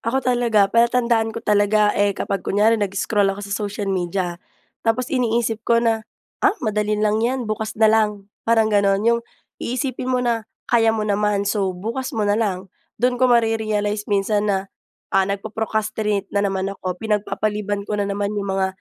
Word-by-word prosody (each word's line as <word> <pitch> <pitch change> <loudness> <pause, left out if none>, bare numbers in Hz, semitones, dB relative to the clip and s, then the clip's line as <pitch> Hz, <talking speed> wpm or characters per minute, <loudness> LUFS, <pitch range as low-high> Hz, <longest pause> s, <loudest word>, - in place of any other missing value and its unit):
ako 260 +4 -1
talaga, 240 -4 +3
palatandaan 235 -1 +3
ko - - -6
talaga, 210 0 +3
eh, 205 -1 +1
kapag 195 -2 -2
kunyari 215 +4 +2
nag-scroll 200 0 +1
ako 200 +1 -3
sa 200 - -6
social 205 0 -3
media, 180 -1 -2 0.4
tapos 240 +4 -1
iniisip 235 -3 0
ko 235 +1 +2
na, 230 -1 +2 0.4
“Ah, 405 +1 +3
madali 210 -1 0
lang 215 +1 +1
‘yan, 250 +2 0
bukas 215 0 -3
na 220 - +3
lang.” 210 -2 0 0.2
Parang 225 -2 +3
gano’n. 200 0 +3
‘Yung 235 0 +3 0.4
iisipin 255 0 -3
mo 250 -1 +1
na 230 -2 -1 0.2
kaya 230 -1 +3
mo 220 -1 +1
naman, 205 -1 +1
so, 195 -3 -1
bukas 235 +7 -4
mo 215 - +1
na 205 - +2
lang. 195 -4 -2 0.2
Do’n 245 +2 0
ko 255 - +5
mare-realize 215 -3 +1
minsan 205 +1 +1
na, 195 -1 -1 0.4
ah, 195 0 +3
nagpo-procrastinate 215 0 -2
na 200 - +2
naman 195 -1 -1
ako, 185 -2 -5
pinagpapaliban 210 -1 -2
ko 210 0 -2
na 200 - -1
naman 200 +1 -2
‘yung 200 -2 -2
mga 190 - +2
210 Hz, 170 wpm, -21 LUFS, 200-225 Hz, 0.4 s, ko